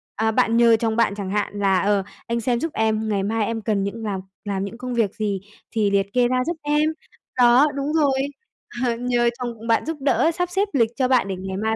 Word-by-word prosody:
à, 220 +1 +1
bạn 225 +1 +2
nhờ 235 -1 +6
chồng 225 -1 0
bạn 230 -3 +2
chẳng 200 -2 -5
hạn 205 0 -2
là 195 -2 +3
"Ờ, 200 -1 +2 0.2
anh 235 0 -1
xem 240 0 0
giúp 325 -1 -3
em, 220 0 0
ngày 200 -2 0
mai 215 +1 0
em 225 0 -3
cần 205 -2 0
những 220 +3 -4
làm 200 -3 -2 0.3
làm 195 -1 -2
những 230 +4 -8
công 250 0 -5
việc 220 -4 0
gì 200 -3 -2 0.3
thì 210 -3 +1
liệt 200 0 0
kê 245 -1 +3
ra 255 0 +1
giúp 340 -1 -2
em." 295 +1 +2 0.5
Đó, 250 +4 +6
đúng 280 +2 -2
rồi! 280 -4 +2 0.6
Ờ, 235 -1 +1
nhờ 240 0 +1
chồng 235 -2 -5
bạn 230 - +2
giúp 320 -1 -3
đỡ, 270 +3 +2
sắp 355 +1 -2
xếp 395 +3 +1
lịch 230 -4 +3
cho 260 -2 +1
bạn 255 -6 +3
để 190 - -3
ngày 190 +1 -5
mai 220 +1 0
230 Hz, 240 wpm, -22 LUFS, 205-255 Hz, 0.6 s, nhờ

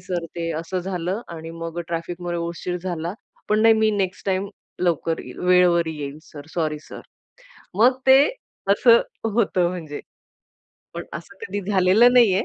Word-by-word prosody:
Sir 175 -2 -3
ते 165 -1 -2
असं 180 +3 -4
झालं 185 +2 -3
आणि 165 -1 -8
मग 165 0 -6
अ, - - -1
ट्रॅफिकमध्ये 175 +1 -4
उशीर 170 +1 -3
झाला, 175 -2 -3 0.4
पण 215 +1 +3
नाही 225 0 +7
मी 220 0 +3
नेक्स्ट 195 -3 -2
टाईम 190 +1 0 0.3
लवकर 165 -2 0
येईल, - - -11
वेळेवर 180 -2 +4
येईल 150 -2 -6
सर, 145 -2 -12
सॉरी 155 -3 -1
सर. - - -9 0.6
अ, - - -20 0.2
मग 250 +4 +4
ते 265 +1 +8 0.5
असं 230 +3 +6 0.3
होतं, 190 -6 +2
म्हणजे 160 -5 -6 0.9
पण - - -5
असं - - -9
कधी 205 - -3
झालेलं 195 +6 +5
नाहीये. 215 -6 +5
180 Hz, 160 wpm, -23 LUFS, 165-200 Hz, 0.9 s, ते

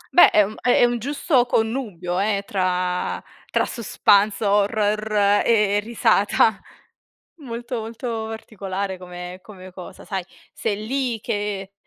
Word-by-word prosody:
Beh, 355 - +9
ehm, 210 0 +3
è - - 0
è - - +7
un 240 0 0
giusto 280 +1 +1
connubio 220 -8 -1
eh 200 0 0
tra 180 -2 -1 0.3
tra - - +1
suspance, 210 -2 +2
horror 205 0 +2
e 210 -3 +3
risata. 220 -1 +2 0.8
Molto 245 -4 -5
molto 225 0 -4
particolare 200 -3 -5
come 180 0 -8
come 185 -2 -12
cosa, 180 -1 -11
sai. 190 -2 -3 0.3
Sei 215 -1 -3
lì 255 -2 -1
che, 205 -2 -3
210 Hz, 120 wpm, -22 LUFS, 195-230 Hz, 0.8 s, Beh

